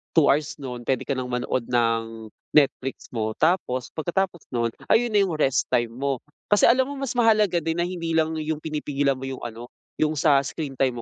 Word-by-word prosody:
2 160 -4 +5
hours 145 +1 0
nun 125 -3 -6
puwede 130 -2 +1
ka - - -4
nang 130 -1 -3
manood 125 0 -2
ng 115 -2 0 0.3
Netflix 135 -2 +1
mo, 110 -2 -2
tapos 155 -7 +1
pagkatapos 175 +1 -1
nun 115 -1 +1 0.2
ayun 240 +1 +3
na 210 - +4
'yung 180 - -3
rest 135 -5 +2
time 120 -1 +2
mo. 135 +1 -2 0.3
Kasi 205 - +3
alam 255 +2 +4
mo 285 - -5
mas 275 -2 -3
mahalaga 215 -6 +4
din 165 0 -1
na 170 - +1
hindi 170 -2 -3
lang 160 0 +2
'yung 155 0 -3
pinipigilan 145 -3 -1
mo 135 - -6
'yung 130 -1 -6
ano, 115 0 -6 0.3
'yung 155 0 +2
sa 145 -2 +4
screen 140 +1 -4
time 125 -3 +1
140 Hz, 200 wpm, -24 LUFS, 125-170 Hz, 0.3 s, 2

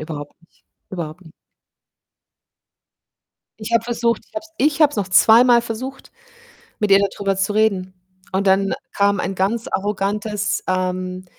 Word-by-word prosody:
überhaupt 150 -2 -7
nicht. 170 - -30 0.3
Überhaupt 170 -1 -6
ni 160 -3 -16 2.3
Ich 215 +2 -7
habe 230 -1 +2
versucht 235 -1 -1
ich - - -32
habe 320 - -2
es 325 - -19
ich 300 +2 +1
habe 295 - +6
es - - -9
noch 200 -2 -2
zweimal 235 +5 +6
versucht, 255 +4 -7 0.7
mit 210 -2 -1
ihr 195 - +7
dadrüber 200 -1 -1
zu 195 +2 0
reden. 195 -4 0 0.4
Und 195 +1 0
dann 195 +1 +3 0.2
kam 200 -1 +2
ein 190 +2 -3
ganz 210 +5 -1
arrogantes, 205 +1 -2
ähm: 185 0 -2
200 Hz, 150 wpm, -20 LUFS, 185-225 Hz, 2.3 s, ihr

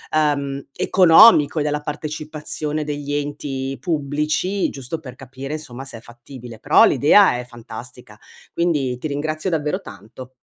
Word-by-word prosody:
ehm, 140 -3 0
economico 180 -3 +6
e - - 0
della 150 0 -2
partecipazione 150 0 -4
degli 145 -1 -4
enti 140 -2 -4
pubblici, 155 +5 -1
giusto 135 +4 -6
per 125 -5 -11
capire 135 +2 -8
insomma 135 -4 -7
se 130 -4 -9
è - - -11
fattibile, 120 -1 -12
però - - +5
l'idea 120 - +4
è 125 - -7
fantastica, 120 -1 -11 0.4
quindi 145 -8 -1
ti 155 - -4
ringrazio 155 +4 -3
davvero 160 +3 -2
tanto. 130 - -12
145 Hz, 135 wpm, -20 LUFS, 130-155 Hz, 0.4 s, economico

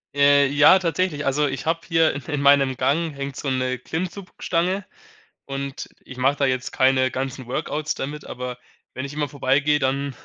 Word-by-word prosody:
Äh, 140 0 +5
ja, 145 +7 +6
tatsächlich. 165 -3 -1
Also, 145 +2 +2
ich 135 +1 -4
habe 165 0 +1
hier 165 -2 +3
in 145 - -6
in 150 -3 -3
meinem 140 -2 +4
Gang 160 +2 0
hängt 140 -1 -5
so 140 - -4
'ne 130 -1 -1
Klimmzugstange. 180 +4 -3 0.6
Und 140 0 -5 0.2
ich 130 - -11
mache 135 +3 +2
da 140 - +1
jetzt 130 0 -1
keine 130 0 +3
ganzen 130 -1 -4
Workouts 150 +3 -2
damit, 145 +2 -5
aber 125 0 -6 0.4
wenn 130 - -4
ich 140 - -6
immer 150 -2 -1
vorbeigehe, 140 +2 +1
dann 135 0 -1
140 Hz, 175 wpm, -23 LUFS, 130-150 Hz, 0.6 s, ja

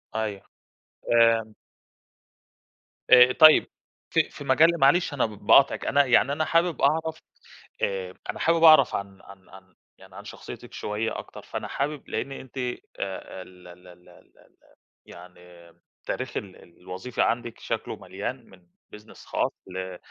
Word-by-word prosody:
أيوه 105 -3 -3 0.7
آآ 115 -2 +3 1.6
آآ، 125 0 +8
طيب 155 +2 +6 0.4
في - - +1
في - - -11
مجال 165 +5 +3
معلش 145 +4 +3
أنا 145 - +1
ب - - -4 0.2
باقاطعِك 140 0 +4
أنا 145 0 +3
يعني 130 +2 +3
أنا 155 +2 -1
حابب 170 0 +1
أعرف 160 +3 +1 0.6
آآ، 95 -2 -2 0.2
أنا - - -4
حابب 165 0 +1
أعرف 155 -5 +7
عن 100 -1 -7
-عن 95 -1 -17
عن 95 -1 -17 0.2
يعني - - -17
عن - - -10
شخصيتِك - - -11
شوية 105 +2 -4
أكتر، - - -11
فأنا - - -6
حابب 145 +1 -4
لإن 140 - -4
أنتِ 135 -1 -10
آآ، 125 -1 -3 0.6
ال 90 -1 -15
ال 90 +1 -15
ال 90 0 -18
ال 90 - -22
ال - - -25 0.5
يعني 90 -1 -16 0.3
تاريخ - - -4
ال 95 -3 -10
الوظيفي 95 +7 -5
عندِك 120 -1 -1
شكلُه 115 - -4
مليان 100 +6 -7
من 90 -2 -20 0.3
business 105 0 -15
خاص - - -1 0.2
ل 95 -1 -6
115 Hz, 145 wpm, -25 LUFS, 95-140 Hz, 1.6 s, آآ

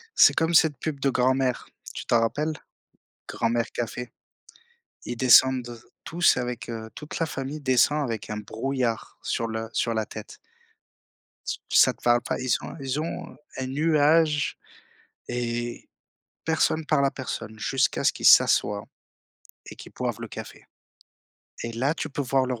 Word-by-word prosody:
C'est - - +7
comme 165 +1 +1
cette 155 -4 +5
pub 145 0 -4
de 135 - +1
Grand’Mère, 130 0 +1 0.3
tu - - -6
t'en 115 -1 +3
rappelles? 150 +7 -1 0.7
Grand’Mère 115 0 -1
café. 120 +1 -5 0.9
Ils 120 - -4
descendent 125 -1 +4 0.2
tous 170 +1 +3
avec, 125 -1 -4
heu, 110 -1 -6
toute 150 - -7
la 165 - +1
famille 145 0 -5
descend 140 +3 +3
avec 110 -7 -4
un 105 - -3
brouillard 115 +2 -3
sur 115 - -2
le 110 0 -4
sur 115 -1 0
la 110 -1 -1
tête. - - -10 1.1
Ç - - -3 0.2
ça - - +6
te - - -28
parle 120 0 +3
pas? - - -3
Ils 130 0 -4
sont 145 - -1
ils 135 +2 -2
ont 165 +1 -5 0.2
un 130 -1 -3
nuage 150 +1 +2 0.7
et 120 0 -4 0.6
personne 160 -1 +1
parle 140 -2 +2
à 135 - +1
personne 115 -4 -6
jusqu'à 135 +3 0
ce - - +3
qu'ils - - -5
s'assoient 100 0 +5 0.8
et - - -10
qu'ils - - -12
boivent - - -3
le - - -6
café - - -9 1.0
et 115 - -4
là, 130 +6 0
tu 160 - -4
peux 145 0 -3
voir 130 0 +1
leurs 125 -3 -3
130 Hz, 155 wpm, -25 LUFS, 115-145 Hz, 1.1 s, C'est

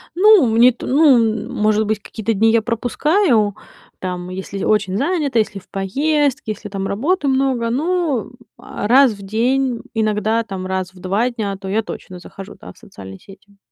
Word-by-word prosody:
Ну, 405 -4 +6
мне 230 +2 +5
это, 245 - -6
ну, 245 -7 +3
может 215 0 +1
быть, 215 0 -1
какие-то 225 +2 -3
дни 220 +2 +3
я 230 0 +3
пропускаю, 240 - +1 0.4
там, 180 -1 -5
если 190 +1 -6
очень 200 -3 +1
занята, 285 - 0
если 210 -2 -2
в - - -23
поездке, 280 +6 -1
если 210 0 -8
там 195 -1 -4
работы 290 - -1
много, 265 -3 +1
ну, 300 - -1 0.3
а 205 - -6
раз 265 +1 +6
в 200 - -13
день, 240 +4 0
иногда, 220 +1 0
там, 190 -3 -6
раз 190 -1 -3
в 180 - -16
2 200 +7 0
дня, 215 -5 -4
то 195 0 -9
я 210 +4 0
точно 185 -3 -9
захожу, 195 +3 -11
да, - - -11
в - - -29
социальные 95 - -12
сети. 200 +1 -18
220 Hz, 175 wpm, -19 LUFS, 200-265 Hz, 0.4 s, Ну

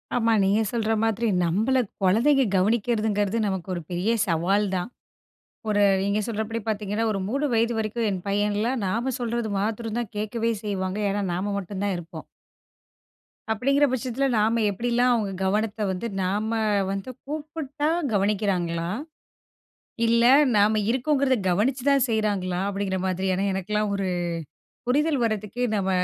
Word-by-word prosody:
ஆமா 230 -1 +3
நீங்க 200 +3 +3
சொல்ற 225 -2 0
மாதிரி 225 +1 +1 0.2
நம்பள 215 +10 +1 0.3
குழந்தைங்க 250 +9 +4
கவனிக்கிறதுங்றது 210 0 +1
நமக்கு 190 -2 -3
ஒரு 175 - -4
பெரிய 180 +6 0 0.2
சவால் 185 +5 +2
தான். 180 +4 -2 0.8
ஒரு 205 -1 +2 0.2
நீங்க 200 +2 +1
சொல்றபடி 225 +1 -3
பார்த்தீங்கன்னா, 210 +1 -1
ஒரு 195 - -2
3 275 +6 -1
வயது 230 +1 +2
வரைக்கும் 220 +1 -1
என் 185 -2 -3
பையன்லாம், 210 +5 0
நாம 230 +7 -1
சொல்றது 235 -2 -2
மாத்தரம் 220 +2 -2
தான் 235 - -6
கேட்கவே 225 +2 -1
செய்வாங்க. 190 -1 -2
ஏன்னா 205 +1 -1
நாம 190 +4 -2
மட்டும் 200 0 -5
தான் 200 -2 0
இருப்போம். 175 -1 -9 1.3
அப்டிங்ற 275 +6 +3
பட்சத்துல 260 +1 -1
நாம 225 +2 +2
எப்டிலாம் 245 +4 +2
அவங்க 215 -4 0
கவனத்த 210 +2 0
வந்து 190 +5 -3 0.2
நாம 205 +4 -1 0.4
வந்து 195 +4 -4 0.2
கூப்புட்டா 300 0 -4 0.3
கவனிக்கிறாங்களா? 190 -5 0 1.2
இல்ல 235 +1 +3 0.3
நாம 210 +1 +4
இருக்கோங்றத 265 +1 +2
கவனிச்சு 235 +9 +1
தான் 275 -3 +4
செய்றாங்களா? 200 -5 0
அப்டிங்ற 195 -1 -2
மாதிரி. 185 +1 -1
ஏன்னா 190 +2 -1
எனக்குல்லாம் 210 +2 -1
ஒரு 195 -1 -1 0.8
புரிதல் 290 +2 +2
வர்றதுக்கே 215 +2 -2
நம்ம 195 -2 0
215 Hz, 135 wpm, -25 LUFS, 195-235 Hz, 1.3 s, குழந்தைங்க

